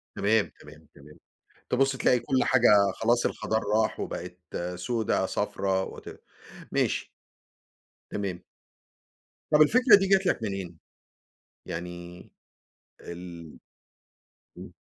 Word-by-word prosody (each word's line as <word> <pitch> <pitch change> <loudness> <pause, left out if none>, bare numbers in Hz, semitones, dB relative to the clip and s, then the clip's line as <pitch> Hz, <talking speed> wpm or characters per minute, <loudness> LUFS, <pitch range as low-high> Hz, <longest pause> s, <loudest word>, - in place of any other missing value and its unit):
تمام، 105 +1 +1
تمام، 75 +2 -15
تمام، 75 +2 -16 0.5
تبُص 135 +1 +2
تلاقي 125 -1 +3
كلّ 130 +2 +1
حاجة 105 -6 +4
خلاص 120 +1 +1
الخَضار 110 0 -1
راح، 110 +1 0
وبقِت 90 0 -6 0.4
سودا 110 +5 -1
صفرا 95 -1 -1
وات - - -8 0.7
ماشي. - - 0 1.0
تمام. 95 -4 -4 1.1
طب 150 0 +5
الفكرة 235 - +7
دي 195 -1 +2
جات 195 0 +3
لك 150 -10 0
منين؟ 95 -5 -5 0.9
يعني 90 +1 -8 0.7
ال 85 -2 -10 1.0
امم. - - -11
100 Hz, 100 wpm, -27 LUFS, 90-125 Hz, 1.1 s, الفكرة